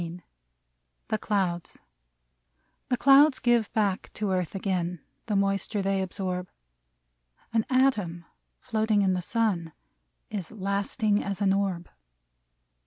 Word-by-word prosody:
154 170 - -9 0.7
THE 215 - +1
CLOUDS 185 -5 -2 1.1
'T^HE 250 - +1
clouds 275 +2 +6
give 240 -3 +2
back 200 -4 0
to 210 -2 -2
earth 185 0 -1
again 180 -3 -1 0.3
The 210 - 0
moisture 195 +1 0
they 195 0 +1
absorb; 185 -1 -3 1.0
An 225 -1 +1
atom 215 -11 +1 0.3
floating 220 -3 +1
in 190 -1 +2
the 180 - -1
sun 180 -6 -1 0.6
Is 195 -6 -4
lasting 205 +1 0
as 195 -1 -3
an 195 -2 +3
orb. 190 -3 -1
195 Hz, 115 wpm, -27 LUFS, 180-220 Hz, 1.1 s, clouds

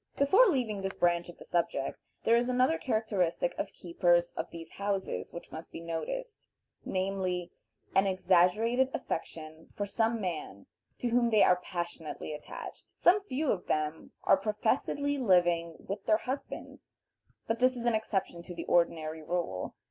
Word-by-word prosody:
Before 385 - +6
leaving 235 - 0
this 195 0 -3
branch 175 0 +2
of 175 - -11
the - - -12
subject, 170 -5 -1 0.2
there 230 - +5
is 240 +1 +2
another 255 +6 +3
characteristic 200 - 0
of - - -2
keepers 175 0 +2
of - - -3
these 165 -1 -9
houses 200 -1 -2
which 170 - -9
must 160 +1 -8
be - - -7
noticed, 290 - -5 0.4
namely, 185 -2 -1 0.4
an 195 +1 +4
exaggerated 190 +7 +3
affection 160 0 -5
for 205 - -1
some 225 +3 +1
man 160 - -4 0.3
to 245 - -1
whom 235 0 +3
they 215 -2 +5
are 180 0 +4
passionately 170 -3 -5
attached. 150 - -9
Some 380 +4 +5
few 295 -4 0
of 180 - -3
them 155 +1 -1
are - - +5
professedly 245 +7 0
living 175 -6 +3
with 200 +1 -6
their 215 - +5
husbands, 260 +4 -6 0.5
but 225 +1 -1
this 255 +1 +4
is 240 -1 -5
an 240 - +3
exception 195 -5 -1
to 175 +1 -9
the 170 - -5
ordinary 160 -2 +1
rule. 160 - -3
190 Hz, 155 wpm, -31 LUFS, 170-235 Hz, 0.5 s, Before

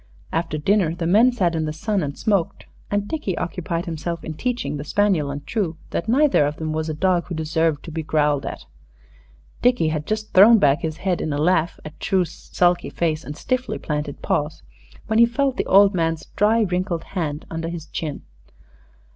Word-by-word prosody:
After 165 -1 -1
dinner 170 +1 +2
the 170 -1 -3
men 215 +9 +5
sat 185 -8 0
in 160 -1 -1
the 155 - -2
sun 200 +5 -1
and 145 -1 -4
smoked, 200 -6 0 0.2
and 205 0 -1
Dickie 210 - -3
occupied 170 0 -3
himself 170 +1 -4
in 160 - -5
teaching 240 -3 -2
the 145 - -5
spaniel 175 -2 +1
and 140 0 -6
True 185 -7 -2
that 190 - -2
neither 265 - +4
of 145 - -3
them 155 0 -3
was 160 0 -2
a 155 - -3
dog 180 +1 +1
who 175 - -4
deserved 160 -1 0
to 165 - -7
be 160 +1 -3
growled 150 -2 +1
at. - - -6 1.0
Dickie 245 -10 +3
had 155 -1 -3
just 215 0 -3
thrown 215 +5 +8
back 145 -3 +3
his 160 -1 -3
head 185 -2 -1
in 155 - -2
a 145 - -1
laugh 165 +2 +1
at 155 - -10
True's 185 -4 0
sulky 175 0 0
face 160 -2 -1
and 150 - -7
stiffly 255 0 -2
planted 150 -2 -4
paws, 150 +1 -1 0.4
when 220 0 +1
he 235 - +8
felt 265 +2 0
the - - -1
old 200 +1 +6
man's 165 -2 -1
dry, 220 +3 +3
wrinkled 180 -3 -1
hand 155 -5 -3
under 165 0 -3
his 170 -2 -6
chin. 155 -3 -5
170 Hz, 195 wpm, -22 LUFS, 155-205 Hz, 1.0 s, thrown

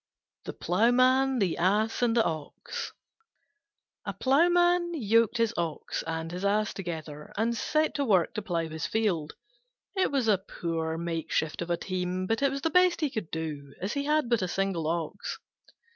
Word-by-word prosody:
THE - - -5
PLOUGHMAN, 255 +7 +3
THE 195 -7 0
ASS, 210 +6 +2
AND 240 -1 +2
THE 230 - +5
OX 155 -2 -4 1.1
A - - -4
Ploughman 345 +5 +3
yoked 230 -3 +3
his 230 -1 +2
Ox 165 -3 -3
and 165 0 -3
his 180 +2 -5
Ass 210 +1 +1
together, 160 -5 -6
and 230 +2 +1
set 310 +6 +1
to 285 - 0
work 190 -8 +3
to 215 - -3
plough 170 -4 -2
his 160 0 -4
field. 185 -9 0 0.6
It 380 - +2
was 270 -5 +1
a 205 -4 +4
poor 165 -4 -3
makeshift 165 -1 -2
of 170 - -4
a 170 - +1
team, 185 0 -2
but 225 +6 0
it 280 - +4
was 275 +1 -4
the 325 - +1
best 360 0 +4
he 300 -3 +1
could 215 -10 -4
do, 150 -4 -5
as 195 +4 -2
he 280 0 -2
had 300 -2 +2
but 235 -3 +2
a 185 - 0
single 180 -3 -1
Ox. 170 +4 -3
200 Hz, 175 wpm, -28 LUFS, 165-255 Hz, 1.1 s, THE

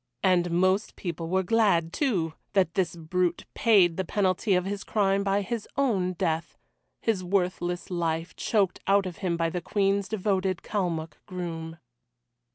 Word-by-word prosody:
And 180 -2 +3
most 185 +4 +1
people 170 -2 -5
were 190 +1 +2
glad, 180 -5 +2
too, 185 - 0 0.2
that 185 -4 +2
this 185 -2 0
brute 175 +1 -1
paid 190 -8 +4
the 190 - 0
penalty 190 +1 +1
of 180 0 +1
his 200 +1 -3
crime 200 -2 +1
by 200 +1 +1
his 225 +2 -4
own 200 -10 +1
death 165 -2 -2 0.5
his 215 -5 +1
worthless 180 -1 -1
life 165 -1 -2
choked 200 -5 +1
out 195 0 +4
of 180 -2 -6
him 175 -3 -1
by 165 -1 0
the 180 - -3
Queen's 195 +2 0
devoted 190 -3 0
Kalmuck 170 -6 -3
groom. 165 -3 -5
185 Hz, 155 wpm, -27 LUFS, 170-200 Hz, 0.5 s, paid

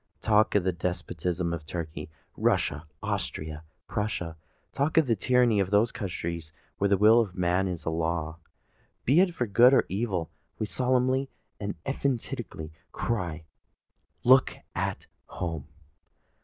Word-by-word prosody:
Talk 110 0 +3
of 100 - +4
the 95 - +2
despotism 90 0 -2
of 80 -2 -4
Turkey, 80 -2 -5 0.3
Russia, 75 +3 0 0.2
Austria, 75 0 -3
or 80 0 -19
Prussia,—talk 90 - -3
of 160 - +6
the 115 -3 +2
tyranny 120 0 +3
of 95 -2 +1
those 105 +3 +3
countries 85 -5 -4 0.3
where 100 - +3
the 100 0 +3
will 110 +4 +7
of 105 -6 0
one - - -8
man 90 +2 +2
is 90 -3 -4
a 80 - 0
law, 80 0 -2 0.7
be 140 +7 +5
it 180 -2 +3
for 120 - 0
good 120 +5 +6
or - - +4
evil,—we 95 0 -3
solemnly 130 +3 +1 0.3
and 100 0 -3
emphatically 125 - -3 0.2
cry, 85 -9 -2 0.8
"Look 130 +1 +5 0.2
at - - -2 0.2
home!" 80 -5 -4
95 Hz, 140 wpm, -28 LUFS, 85-120 Hz, 0.8 s, will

